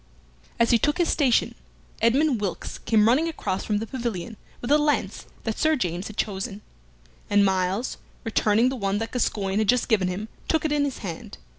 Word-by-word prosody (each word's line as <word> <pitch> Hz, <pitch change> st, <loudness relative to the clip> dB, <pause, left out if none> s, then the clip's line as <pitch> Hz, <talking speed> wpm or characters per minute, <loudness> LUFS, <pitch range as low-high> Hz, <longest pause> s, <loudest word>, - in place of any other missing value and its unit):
As 235 Hz, +1 st, +4 dB
he 235 Hz, -, +5 dB
took 295 Hz, +8 st, +1 dB
his 345 Hz, -2 st, +2 dB
station 265 Hz, -6 st, +2 dB, 0.5 s
Edmund 250 Hz, +1 st, +3 dB
Wilkes 195 Hz, -4 st, -4 dB
came 220 Hz, -1 st, +3 dB
running 275 Hz, +8 st, +3 dB
across 200 Hz, -, -3 dB
from 210 Hz, -, 0 dB
the 220 Hz, -, -2 dB
pavilion 230 Hz, -3 st, -4 dB, 0.2 s
with 245 Hz, -, -4 dB
a 300 Hz, -, +6 dB
lance 295 Hz, -1 st, 0 dB, 0.2 s
that 225 Hz, -1 st, -3 dB
Sir 315 Hz, 0 st, +3 dB
James 180 Hz, -, -2 dB
had 215 Hz, -, -10 dB
chosen, 200 Hz, 0 st, -3 dB, 0.7 s
and 205 Hz, 0 st, +4 dB
Myles, 190 Hz, +5 st, 0 dB, 0.3 s
returning 225 Hz, +1 st, +2 dB
the 265 Hz, -, -3 dB
one 200 Hz, -4 st, -1 dB
that 225 Hz, +2 st, -3 dB
Gascoyne 205 Hz, -5 st, 0 dB
had 215 Hz, -, 0 dB
just 250 Hz, -1 st, +3 dB
given 200 Hz, -5 st, +3 dB
him, 190 Hz, +4 st, -4 dB, 0.2 s
took 320 Hz, -1 st, +1 dB
it 310 Hz, -, 0 dB
in 290 Hz, -1 st, +2 dB
his 275 Hz, -, -3 dB
hand. 165 Hz, -, -7 dB
225 Hz, 190 wpm, -25 LUFS, 200-260 Hz, 0.7 s, a